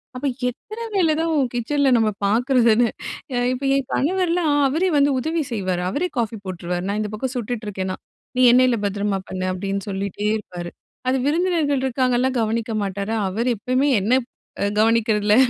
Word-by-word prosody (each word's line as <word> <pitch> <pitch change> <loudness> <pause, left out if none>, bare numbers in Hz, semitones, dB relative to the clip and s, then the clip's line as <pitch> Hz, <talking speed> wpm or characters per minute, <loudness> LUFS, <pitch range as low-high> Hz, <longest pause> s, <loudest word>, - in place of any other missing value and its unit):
அப்ப 255 - -5 0.2
எத்தன 430 - -9
வேல 330 -5 +3
தான் 330 0 0 0.2
கிச்சன்ல 275 +4 +1
நம்ம 220 -1 +3 0.2
பார்க்கறதுன்னு, 235 +1 +3 0.5
அ - - +1 0.2
இப்ப 260 +2 -5
என் 275 -2 -1
கணவர்லாம் 345 0 +1 0.2
அவரே 335 +7 +1
வந்து 285 0 +4
உதவி 320 +4 -1
செய்வாரு. 185 -5 -1
அவரே 350 - -1
காஃபி 225 -1 -1
போட்டுருவாரு. 180 -1 -3
நான் 210 +1 -1
இந்த 210 - -3
பக்கம் 255 +4 -3
சுட்டுட்ருக்கேன்னா. 205 -5 -3 0.4
"நீ - - +3
எண்ணெய்ல 250 -1 +4
பத்திரமா 200 -1 -1
பண்ணு" 185 0 -3
அப்டின்னு 195 +2 -3
சொல்லிட்டே 200 +1 -3
இருப்பாரு. 175 -4 -7 0.4
அது 265 - +2
விருந்தினர்கள் 310 -3 +1
இருக்காங்கல்லாம் 255 0 +1
கவனிக்க 225 +1 -1
மாட்டாரு. 200 +2 -3
அவரு 230 +6 -1
எப்பயுமே 255 +6 +1
என்ன 250 +6 +3
ப் - - -60 0.3
அ - - +2
கவனிக்கிறதுல 215 -2 +3
235 Hz, 155 wpm, -22 LUFS, 200-275 Hz, 0.5 s, வந்து